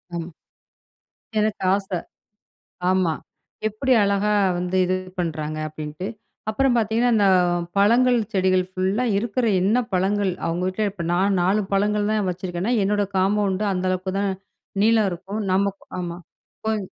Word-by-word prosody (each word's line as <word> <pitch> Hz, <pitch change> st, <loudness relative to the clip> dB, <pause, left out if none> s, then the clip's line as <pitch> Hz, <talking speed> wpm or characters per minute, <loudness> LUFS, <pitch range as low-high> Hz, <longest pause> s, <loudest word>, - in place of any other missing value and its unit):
ஆமா. 170 Hz, 0 st, -4 dB, 1.1 s
எனக்கு 215 Hz, -1 st, 0 dB
ஆச. 195 Hz, -1 st, -3 dB, 1.0 s
ஆமா. 185 Hz, -3 st, +2 dB, 0.6 s
எப்படி 235 Hz, +5 st, 0 dB
அழகா 200 Hz, +1 st, +2 dB, 0.3 s
வந்து 180 Hz, +1 st, -2 dB
இது 185 Hz, +1 st, +1 dB, 0.2 s
பண்றாங்க 155 Hz, -3 st, -2 dB
அப்படின்ட்டு. 155 Hz, +3 st, -6 dB, 0.4 s
அப்புறம் 255 Hz, +4 st, +2 dB
பாத்தீங்கன்னா 230 Hz, +2 st, +2 dB
இந்த 205 Hz, -2 st, +4 dB, 0.5 s
பழங்கள், 245 Hz, +5 st, +5 dB, 0.2 s
செடிகள் 185 Hz, -2 st, +2 dB
ஃபுல்லா 190 Hz, +6 st, 0 dB
இருக்குற 235 Hz, +3 st, -1 dB
என்ன 205 Hz, +7 st, +3 dB
பழங்கள். 190 Hz, +1 st, +1 dB
அவங்க 170 Hz, +2 st, -1 dB
வீட்ல 210 Hz, +3 st, -1 dB
இப்ப 190 Hz, -3 st, -7 dB
நான் 190 Hz, +3 st, +2 dB
4 190 Hz, +4 st, +2 dB
பழங்கள் 205 Hz, +1 st, +1 dB
தான் 215 Hz, -2 st, +1 dB
வச்சுருக்கேன்னா, 180 Hz, +4 st, -2 dB
என்னோட 205 Hz, +1 st, +1 dB
காம்பவுண்ட்டு 195 Hz, +1 st, +1 dB
அந்த 180 Hz, -1 st, -2 dB
அளவுக்குதான் 190 Hz, +2 st, -1 dB, 0.5 s
நீளம் 220 Hz, -2 st, +4 dB
இருக்கும். 195 Hz, +5 st, -5 dB
நமக்கு 195 Hz, +1 st, 0 dB
ஆமா. 175 Hz, -1 st, -4 dB, 0.5 s
கொஞ் 220 Hz, -1 st, 0 dB
195 Hz, 125 wpm, -23 LUFS, 185-210 Hz, 1.1 s, பழங்கள்